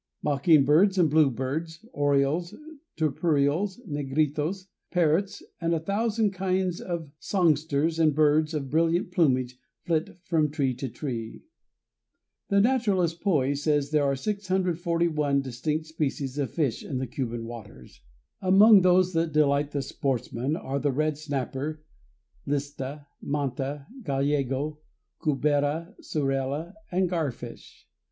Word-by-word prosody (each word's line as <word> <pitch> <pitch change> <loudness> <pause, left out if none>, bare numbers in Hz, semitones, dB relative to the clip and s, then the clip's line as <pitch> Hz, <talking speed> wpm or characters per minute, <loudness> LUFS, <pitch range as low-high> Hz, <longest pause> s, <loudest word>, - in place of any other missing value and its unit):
Mockingbirds 155 +5 +4
and 165 -5 +3
blue 155 -2 +5
birds, 155 - -4
orioles, 145 +4 +1 0.4
turpials, 155 - +1
negritos, 150 +5 -1 0.2
parrots, 175 +2 +1 0.2
and 170 0 +1
a - - 0
thousand 210 +4 0
kinds 185 -1 -1
of 170 -5 -5
songsters 160 -3 +1
and 155 -3 +3
birds 155 +1 +3
of 140 -3 -4
brilliant 165 +3 +1
plumage 130 -7 +1 0.2
flit 165 -1 -1
from 155 -4 +1
tree 140 -3 0
to 130 +2 -5
tree. 115 -4 -6 1.1
The 200 -1 +4
naturalist 200 -8 +2
Poey 145 -8 +2
says 145 0 0
there 150 -1 +3
are 140 -1 +1
641 170 -5 0
distinct 150 +5 -2
species 145 -3 -3
of 140 - -1
fish 145 -9 -1
in 135 - -4
the 130 - -2
Cuban 120 -2 -4
waters. 110 - -11 0.4
Among 195 +2 +7
those 185 0 +4
that 165 0 0
delight 145 -1 +2
the 145 -2 -2
sportsman 130 +1 -2
are 140 -3 -3
the 145 0 +1
red 155 +3 0
snapper, 145 +1 -4 0.6
lista, 145 0 -3 0.2
manta, 140 0 -3 0.2
gallego, 140 - -1 0.4
cubera, 150 +4 0
surela, 140 +3 -2 0.2
and 185 +1 +2
garfish. 145 -9 -5
150 Hz, 120 wpm, -27 LUFS, 140-170 Hz, 1.1 s, Among